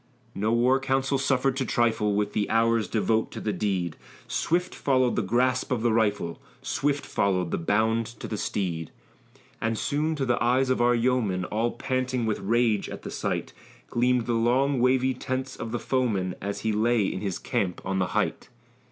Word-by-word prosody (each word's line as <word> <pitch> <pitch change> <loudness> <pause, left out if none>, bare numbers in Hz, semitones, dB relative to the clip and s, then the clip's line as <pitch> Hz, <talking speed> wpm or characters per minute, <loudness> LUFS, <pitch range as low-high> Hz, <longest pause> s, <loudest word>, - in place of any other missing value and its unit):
No 105 +3 0
war 125 +3 +3
council 135 +1 0
suffered 135 -1 +1
to 135 - +1
trifle 110 -4 +1
With 105 0 0
the 105 - 0
hours 115 -1 +2
devote 110 0 +1
to - - -5
the 105 - -2
deed; 90 -6 -1 0.3
Swift 180 +2 0
followed 130 -3 +1
the - - +1
grasp 125 +6 +1
of 120 -3 0
the 120 -2 +3
rifle, 105 -6 0 0.2
Swift 145 0 -1
followed 90 -3 0
the - - -1
bound 110 +5 +1
to 115 0 -8
the 110 - -3
steed; 90 -6 -2 0.7
And 110 0 0
soon, 155 +6 0
to 140 -3 -1
the 120 -1 +1
eyes 130 +2 +2
of 130 - +1
our 120 0 +4
yeomen, 115 -7 +1
All 115 +4 -1
panting 130 -2 -1
with 110 -2 -1
rage 115 -1 +1
at - - -8
the - - -6
sight, - - -3 0.4
Gleamed 125 0 +2
the 120 - 0
long 125 +4 +2
wavy 130 +1 +3
tents 130 +1 -4
of 115 - -6
the 120 - -1
foeman, 110 -9 0
As 100 +1 -4
he 110 - 0
lay 110 +1 +2
in 95 - -3
his 100 -4 -2
camp 90 -2 -2
on 95 0 -1
the 90 - +1
height. - - -1
115 Hz, 185 wpm, -26 LUFS, 105-130 Hz, 0.7 s, our